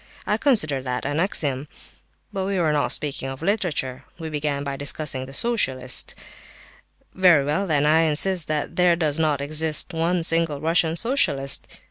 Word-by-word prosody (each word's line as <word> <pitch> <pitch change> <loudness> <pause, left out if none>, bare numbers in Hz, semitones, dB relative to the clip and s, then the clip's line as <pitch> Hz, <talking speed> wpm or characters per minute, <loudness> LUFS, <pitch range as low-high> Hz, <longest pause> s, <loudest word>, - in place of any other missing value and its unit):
I - - 0
consider 155 - +1
that 125 -1 -4
an 145 +2 -2
axiom. 145 -6 -1 0.7
But 190 -1 -3
we 200 -1 -2
were 160 -4 +1
not 145 - 0
speaking 140 -2 0
of 135 +3 -8
literature; 165 - -2
we 160 -2 -7
began 145 -1 -2
by 140 -1 -4
discussing 140 -2 -1
the - - -11
socialists. 135 - 0 1.0
Very 175 -7 +4
well 150 +7 -1
then, 150 -3 +1
I 155 +2 +4
insist 165 +2 +2
that 150 -1 -3
there 180 -1 +4
does 155 -2 -1
not 150 -3 0
exist 155 +2 +1
one 165 +1 -1
single 165 -3 +2
Russian 165 +1 +1
socialist. 145 - +1
155 Hz, 160 wpm, -22 LUFS, 140-170 Hz, 1.0 s, Very